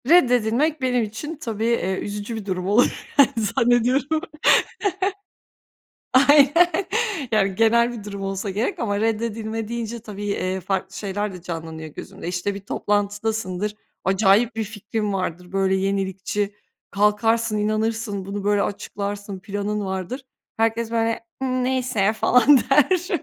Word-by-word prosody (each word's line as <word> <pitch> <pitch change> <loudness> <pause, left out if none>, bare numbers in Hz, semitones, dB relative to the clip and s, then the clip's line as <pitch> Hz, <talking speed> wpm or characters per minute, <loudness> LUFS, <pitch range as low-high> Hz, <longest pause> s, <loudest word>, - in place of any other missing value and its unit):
Reddedilmek, 265 -1 +4
benim 250 -2 +2
için 220 +10 -5
tabii, 225 -7 -4
eee, 190 -5 0
üzücü 205 +2 -5
bir 220 -3 -6
durum 185 -2 -2
olur 210 +5 +2
yani, 280 -3 +7
zannediyorum. 245 +7 +2 1.9
Aynen, 290 +7 +5 0.5
yani, 195 -3 +2
genel 235 +3 +3
bir 225 -4 -8
durum 200 -1 -6
olsa 195 +1 -3
gerek 210 +6 -1
ama 205 -3 -1
reddedilme 225 0 -2
deyince 235 0 -4
tabii, 205 -2 -8
eee, 190 -2 -1
farklı 190 0 -3
şeyler 205 +1 -3
de 180 -2 -10
canlanıyor 160 -2 -6
gözümde. 155 - -8
İşte 180 +3 -2
bir 200 - -6
toplantıdasındır, 205 0 -1 0.3
acayip 200 +4 +3
bir 220 - -1
fikrin 210 0 -3
vardır, 180 -1 -4
böyle 195 0 +2
yenilikçi, 195 +1 -1 0.4
kalkarsın, 215 +2 +2
inanırsın, 215 -1 -1
bunu 200 +1 -5
böyle 205 0 +3
açıklarsın, 205 0 -4
planın 205 +1 -3
vardır. 190 +7 -4 0.3
Herkes 225 0 0
böyle: 230 0 0 0.2
"ııı, 255 -1 0
neyse 250 -6 +1
falan 250 +5 +5
"der. 340 +6 +4
210 Hz, 130 wpm, -23 LUFS, 195-235 Hz, 1.9 s, yani